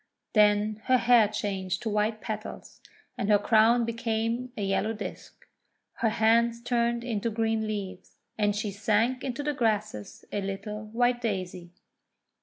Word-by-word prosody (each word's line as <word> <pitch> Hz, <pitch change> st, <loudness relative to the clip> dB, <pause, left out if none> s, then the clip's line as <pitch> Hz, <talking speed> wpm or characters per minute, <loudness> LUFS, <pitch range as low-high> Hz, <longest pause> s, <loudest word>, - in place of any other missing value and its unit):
Then 210 Hz, 0 st, +3 dB
her 255 Hz, -, +4 dB
hair 235 Hz, -3 st, +5 dB
changed 190 Hz, -3 st, -3 dB
to 225 Hz, -, -1 dB
white 215 Hz, +1 st, 0 dB
petals, 215 Hz, -1 st, -7 dB, 0.4 s
and 200 Hz, -, -1 dB
her 210 Hz, -, +6 dB
crown 225 Hz, +3 st, +4 dB
became 230 Hz, +1 st, -2 dB
a 210 Hz, -, -2 dB
yellow 195 Hz, +3 st, 0 dB
disk; 215 Hz, -, -9 dB, 0.5 s
her 225 Hz, -, +2 dB
hands 230 Hz, +2 st, +3 dB
turned 235 Hz, 0 st, 0 dB
into 230 Hz, -2 st, -2 dB
green 225 Hz, 0 st, 0 dB
leaves; 195 Hz, -3 st, -6 dB, 0.2 s
and 205 Hz, -1 st, +1 dB
she 210 Hz, 0 st, -2 dB
sank 220 Hz, +5 st, +1 dB
into 265 Hz, +2 st, -3 dB
the 295 Hz, 0 st, -1 dB
grasses 215 Hz, -, -2 dB
a 205 Hz, -, -1 dB
little 200 Hz, +2 st, -5 dB
white 240 Hz, +3 st, +1 dB
Daisy! 185 Hz, -5 st, -3 dB
220 Hz, 145 wpm, -28 LUFS, 205-235 Hz, 0.5 s, her